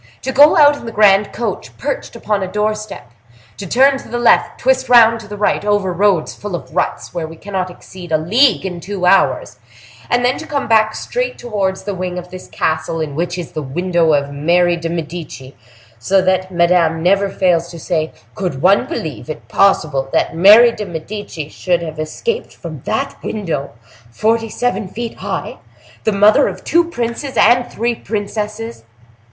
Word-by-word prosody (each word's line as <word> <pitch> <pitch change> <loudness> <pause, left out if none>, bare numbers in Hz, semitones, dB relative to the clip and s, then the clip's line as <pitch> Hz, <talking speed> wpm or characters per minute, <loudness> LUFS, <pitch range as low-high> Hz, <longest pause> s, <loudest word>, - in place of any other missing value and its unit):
To 265 - -2
go 290 +6 +6
out 290 -1 +6
in 235 - -10
the - - -4
grand 205 -2 +4
coach, 235 - -5
perched - - -4
upon 210 -2 -2
a 185 -1 -4
doorstep; 215 - -3 0.5
to 200 - -7
turn 270 +6 +4
to - - -12
the 240 - -3
left, 240 -1 +3
twist 260 0 +1
round 230 -2 +6
to 215 - -12
the 210 0 -8
right, 205 - 0
over 205 -3 0
roads 190 -3 +1
full 205 -3 -6
of - - -9
ruts, - - -2
where 170 -2 -3
we 165 - -11
cannot 190 +1 -4
exceed 180 -1 -12
a 155 - +4
league 215 - +2
in 180 -2 -4
two 190 0 -4
hours; 195 +2 +2 0.5
and 245 0 +2
then 250 - +1
to 320 - -8
come 285 -2 -2
back 220 -1 +3
straight - - -3
towards 200 -5 -2
the 205 - -3
wing 180 -1 -4
of 180 0 -8
the 185 - -7
castle 160 +1 -1
in 155 -3 -3
which 175 +4 -3
is 175 -3 -6
the 155 - -4
window 170 +3 0
of 140 -1 0
Mary 175 +4 +2
de 165 -1 -4
Medici, 160 -5 -6 0.4
so 190 +12 +2
that 185 0 0
Madame 170 -2 +2
never 195 +2 +3
fails 175 -3 +1
to 170 - -9
say: 160 -2 -2 0.2
'Could 180 -10 -4
one 195 - +3
believe 160 - -6
it 155 -1 -7
possible 150 -9 +2
that - - 0
Mary 210 +7 +7
de 210 -3 -6
Medici 170 -2 -6
should 175 +2 -1
have 155 -1 -7
escaped 450 - -4
from - - -9
that - - -3
window—forty 140 - -3
seven 245 -3 -2
feet 230 +4 -6
high? - - -5 0.5
The 220 - +3
mother 205 +1 +4
of - - -6
two 340 0 +3
princes 250 -2 -4
and 240 +2 +4
three 235 +2 -1
princesses! 215 - -5
195 Hz, 180 wpm, -17 LUFS, 170-225 Hz, 0.5 s, Mary